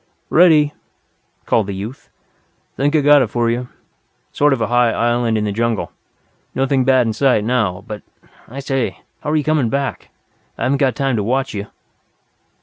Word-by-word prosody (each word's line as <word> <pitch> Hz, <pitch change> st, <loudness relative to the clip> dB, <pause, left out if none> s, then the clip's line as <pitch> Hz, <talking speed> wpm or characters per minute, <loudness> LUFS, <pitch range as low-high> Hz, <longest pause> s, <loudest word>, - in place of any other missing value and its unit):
"Ready," 155 Hz, -4 st, +5 dB, 0.7 s
called 110 Hz, -4 st, +1 dB
the 100 Hz, -, -4 dB
youth. 110 Hz, +7 st, -8 dB, 0.7 s
"Think 145 Hz, +3 st, 0 dB
I've 150 Hz, -, +3 dB
got 145 Hz, 0 st, +6 dB
it 125 Hz, -, +1 dB
for 120 Hz, 0 st, 0 dB
you. 125 Hz, +1 st, -3 dB, 0.6 s
Sort 145 Hz, 0 st, +2 dB
of 135 Hz, -, +1 dB
a 110 Hz, -, +1 dB
high 120 Hz, 0 st, +3 dB
island 120 Hz, -1 st, +1 dB
in 105 Hz, -, -1 dB
the 105 Hz, -, -1 dB
jungle. 115 Hz, +1 st, -1 dB, 0.6 s
Nothing 135 Hz, 0 st, +1 dB
bad 130 Hz, -1 st, +3 dB
in 110 Hz, -, -1 dB
sight 130 Hz, -4 st, +2 dB
now. 110 Hz, -6 st, 0 dB
But, 105 Hz, -3 st, -7 dB, 0.5 s
I 135 Hz, +4 st, -7 dB
say 135 Hz, -2 st, -2 dB, 0.2 s
how're 150 Hz, +1 st, -2 dB
you 150 Hz, -, +1 dB
coming 150 Hz, -6 st, +1 dB
back? 140 Hz, +3 st, -3 dB, 0.5 s
I -, -, -4 dB
haven't 135 Hz, +1 st, +1 dB
got 135 Hz, -3 st, +2 dB
time 135 Hz, -4 st, 0 dB
to 105 Hz, -, 0 dB
watch 130 Hz, +5 st, -1 dB
you." 100 Hz, 0 st, -5 dB
125 Hz, 175 wpm, -18 LUFS, 115-140 Hz, 0.7 s, got